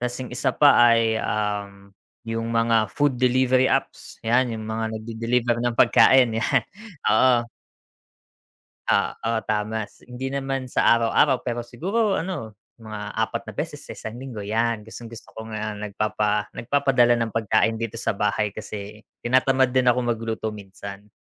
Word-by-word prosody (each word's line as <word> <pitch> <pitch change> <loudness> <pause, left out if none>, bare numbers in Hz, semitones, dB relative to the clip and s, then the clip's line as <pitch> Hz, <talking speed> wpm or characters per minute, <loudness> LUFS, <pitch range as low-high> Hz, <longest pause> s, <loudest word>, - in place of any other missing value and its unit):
'Tapos 125 0 -3
yung - - -10
isa 125 - -1
pa 145 -1 +7 0.2
ay, 115 -1 +2
um 100 -2 -3 0.3
yung 115 0 -3
mga 115 -1 +3
food 145 +1 0
delivery 130 0 +3
apps, - - -2
'yan 120 +1 +2
yung 110 - -7
mga 110 0 -3
nag-de-deliver 115 +2 -1
ng 120 -1 -1
pagkain 130 -3 +5
'yan, 130 -3 +2 0.5
oo. 120 +1 +4 1.4
Ah, - - +2
oh, 115 0 0
tama 110 0 -3
hindi 125 +2 -6
naman 135 -1 -3
sa - - 0 0.2
araw-araw 125 +3 +3
pero 120 0 -4
siguro 195 - -1
ano, 165 - -5 0.2
mga 105 -2 -8
4 - - -1
na - - -7
beses - - -4
sa - - -10
1 110 +2 -8
linggo 125 -6 -7
'yan, 115 +1 -1
gustong-gusto 115 +1 -11
ko 110 0 -9
nga 110 -1 -4
nagpapa 105 0 -2
nagpapadala 125 -2 +2
ng 115 -2 -2
pagkain 110 +1 +1
dito 115 -1 -4
sa 115 - -1
bahay 105 0 0
kasi 105 +1 -8 0.2
tinatamad 130 +1 +3
din 130 -1 +2
akong 125 +1 +3
magluto 110 -1 -3
minsan. 100 0 -10
115 Hz, 150 wpm, -23 LUFS, 110-125 Hz, 1.4 s, pa